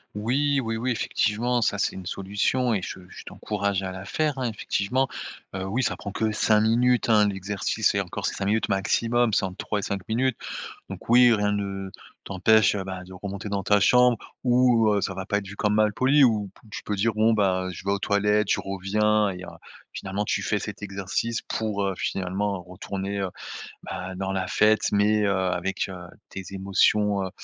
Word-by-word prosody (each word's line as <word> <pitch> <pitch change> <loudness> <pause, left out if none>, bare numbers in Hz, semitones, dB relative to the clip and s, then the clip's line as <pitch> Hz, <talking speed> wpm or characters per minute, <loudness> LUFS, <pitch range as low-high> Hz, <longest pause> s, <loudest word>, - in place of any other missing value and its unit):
Oui, 135 +6 +1
oui, 115 -2 -3
oui 125 +3 -1
effectivement, 120 +1 0
ça 100 -1 +1
c'est - - 0
une 95 - -8
solution 105 +7 0
et 100 - 0
je 90 - -6
je - - -11
t'encourage 100 -2 -2
à 95 - -3
la 95 +1 -8
faire, 150 +4 -1
hein, 130 - -2
effectivement. 120 +4 -1 0.4
Heu, 95 0 -4
oui, 115 +7 -1
ça 100 -7 -1
prend 100 +1 -7
que 110 0 0
5 110 0 +3
minutes, 120 +3 +2
hein, 105 -2 +5
l'exercice 100 0 -1
et - - +2
encore - - -4
c'est - - -1
5 95 - -3
minutes 110 +3 +1
maximum, 115 +4 +1
c'est 105 - +2
entre 95 -1 -4
3 105 - -2
et - - -4
5 95 -2 -4
minutes. 125 +2 0 0.5
Donc - - -9
oui, 120 0 +7
rien 105 -1 +1
ne 100 -1 -4 0.3
t'empêche, 110 +3 +3
heu, 100 - -2
bah 95 -1 -6
de 95 - -12
remonter 100 +3 -6
dans 100 -1 -2
ta 105 +2 +4
chambre 125 +3 +5 0.3
où, 120 -3 +4
heu, 100 - +2
ça 95 - -2
va 95 0 -5
pas 100 - 0
être 100 -1 -5
vu 100 - -9
comme 105 +1 +1
malpoli, 130 +7 +4
où 105 -4 +1
pou 115 - -21
tu - - -6
peux 105 - -2
dire: 110 +3 +1
«Bon, 110 +2 +3
ben, 95 -4 +1
je 90 - -10
vais 100 - +1
aux 100 - 0
toilettes, 105 +1 +1
je - - +2
reviens» 105 +2 +1
et 90 -1 -6
heu, - - -12 0.5
finalement 100 +2 -3
tu - - -1
fais 105 - 0
cet 105 -1 -7
exercice 100 +4 -2
pour, 105 -2 -2
heu, 95 - 0
finalement 95 +1 -2
retourner, 95 +2 -5
heu, 95 - -1 0.5
bah 95 +1 -6
dans 95 +1 -3
la 95 -1 -2
fête, 110 +2 +3
mais 105 +1 +3
heu, 100 - +2
avec, 95 +1 -1
heu, - - -6 0.4
tes 95 - -6
émotions, 100 +1 +2
heu, - - -4
105 Hz, 210 wpm, -25 LUFS, 95-110 Hz, 0.5 s, oui